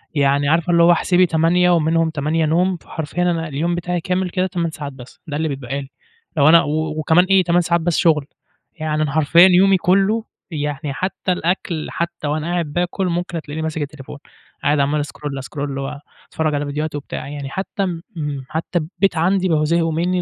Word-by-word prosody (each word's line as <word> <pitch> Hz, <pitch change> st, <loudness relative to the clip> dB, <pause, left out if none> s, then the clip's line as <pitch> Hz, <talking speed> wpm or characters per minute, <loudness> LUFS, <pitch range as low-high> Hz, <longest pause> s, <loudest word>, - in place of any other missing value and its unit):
يعني 140 Hz, 0 st, +2 dB
عارفة 165 Hz, +2 st, +2 dB
اللي 170 Hz, 0 st, +5 dB
هو 175 Hz, -, +7 dB
احسبي 180 Hz, +1 st, +3 dB
8 170 Hz, +2 st, +3 dB
ومنهم 165 Hz, -1 st, +2 dB
8 155 Hz, +2 st, 0 dB
نوم، 180 Hz, +3 st, +1 dB
فحرفيًا 160 Hz, +2 st, -5 dB
أنا 165 Hz, -2 st, 0 dB
اليوم 160 Hz, +4 st, -1 dB
بتاعي 175 Hz, 0 st, -2 dB
كامل 185 Hz, 0 st, -1 dB
كده 185 Hz, +1 st, 0 dB
8 170 Hz, -2 st, -2 dB
ساعات 145 Hz, -3 st, -7 dB
بس، 125 Hz, -1 st, -13 dB
ده 145 Hz, -1 st, -3 dB
اللي 160 Hz, 0 st, 0 dB
بيتبقى 135 Hz, -1 st, -4 dB
لي، 135 Hz, -, -11 dB, 0.5 s
لو 140 Hz, +1 st, +5 dB
أنا 165 Hz, +1 st, +8 dB
و 155 Hz, +1 st, -2 dB
وكمان 160 Hz, +4 st, +4 dB
إيه 190 Hz, -1 st, +4 dB
8 175 Hz, +1 st, +3 dB
ساعات 170 Hz, 0 st, +1 dB
بس 170 Hz, -1 st, 0 dB
شُغل، 155 Hz, -4 st, +3 dB, 0.5 s
يعني 155 Hz, -1 st, -2 dB
أنا 145 Hz, -, -2 dB
حرفيًا 160 Hz, +4 st, +6 dB
يومي 190 Hz, +1 st, +5 dB
كلّه 195 Hz, +5 st, +2 dB, 0.3 s
يعني، 145 Hz, -2 st, -3 dB
حتى 185 Hz, +3 st, -2 dB
الأكْل، 175 Hz, -2 st, -1 dB
حتى 170 Hz, -2 st, -3 dB
وأنا 155 Hz, +2 st, -2 dB
قاعد 165 Hz, -4 st, -2 dB
بااكُل، 180 Hz, +2 st, -1 dB
ممكن 175 Hz, -1 st, -2 dB
تلاقيني 155 Hz, +1 st, -6 dB
ماسك 160 Hz, -1 st, -3 dB
التليفون، 145 Hz, -1 st, -7 dB, 0.5 s
قاعد 145 Hz, 0 st, +2 dB
عمال 145 Hz, +1 st, +1 dB
أscroll، 145 Hz, -2 st, -6 dB
أscroll 140 Hz, -2 st, -4 dB
وأتفرّج 145 Hz, +2 st, -4 dB
على 145 Hz, 0 st, -1 dB
فيديوهات 150 Hz, +1 st, -3 dB
وبتاع، 145 Hz, -, -6 dB
يعني 140 Hz, -1 st, -6 dB
حتى 195 Hz, +4 st, -3 dB
م 170 Hz, -2 st, -4 dB, 0.5 s
حتى 165 Hz, +2 st, -2 dB
البيت 180 Hz, +3 st, -1 dB
عَندي 185 Hz, +3 st, +2 dB
بقوا 155 Hz, -2 st, +2 dB
زهقوا 165 Hz, 0 st, +1 dB
منّي 180 Hz, +3 st, 0 dB
160 Hz, 190 wpm, -20 LUFS, 150-175 Hz, 0.5 s, أنا